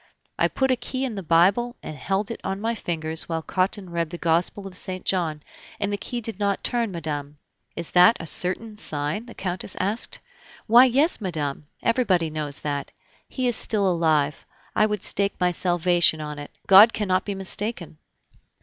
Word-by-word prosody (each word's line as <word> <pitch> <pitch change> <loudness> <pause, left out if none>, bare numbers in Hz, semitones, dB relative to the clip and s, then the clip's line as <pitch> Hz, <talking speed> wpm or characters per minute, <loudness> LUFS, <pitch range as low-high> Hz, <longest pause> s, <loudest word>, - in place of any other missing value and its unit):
"I - - +4
put 265 -1 0
a - - +4
key 255 +2 -4
in 250 - -4
the 200 - -5
Bible 190 +9 +2
and 155 - -7
held 195 - -2
it - - -7
on 195 0 -3
my 225 +2 -1
fingers 160 -6 -4
while 165 -1 -2
Cottin 185 +1 -1
read 170 -1 -2
the 175 - -7
Gospel 170 +4 0
of 190 -2 -7
St. 185 -1 -3
John, 160 -5 -1 0.4
and 205 0 -1
the - - -1
key 240 +4 -5
did 220 -3 -4
not 200 -1 -1
turn, 235 -3 -1
madame." 150 -4 -5 0.4
"Is 170 - -5
that 180 +6 +6
a 165 - -6
certain 190 +7 +1
sign?" 155 +5 0
the 235 - -11
Countess 185 0 -3
asked. 205 +5 -1 0.5
"Why, 240 +3 +7
yes, 275 +4 +2
madame! 150 -6 -4 0.2
everybody 190 -9 +1
knows 150 -2 -4
that. 145 -2 -3 0.4
He 255 -2 -2
is 240 - 0
still 205 -3 +1
alive; 155 -5 +1 0.3
I 215 - +4
would 210 -1 -3
stake 200 0 +1
my 180 -1 +2
salvation 175 -2 +3
on 150 -1 -6
it; 145 - -8 0.2
God 205 +4 +8
cannot 190 -3 0
be 200 - -4
mistaken." 195 -4 -3
185 Hz, 185 wpm, -24 LUFS, 160-215 Hz, 0.5 s, God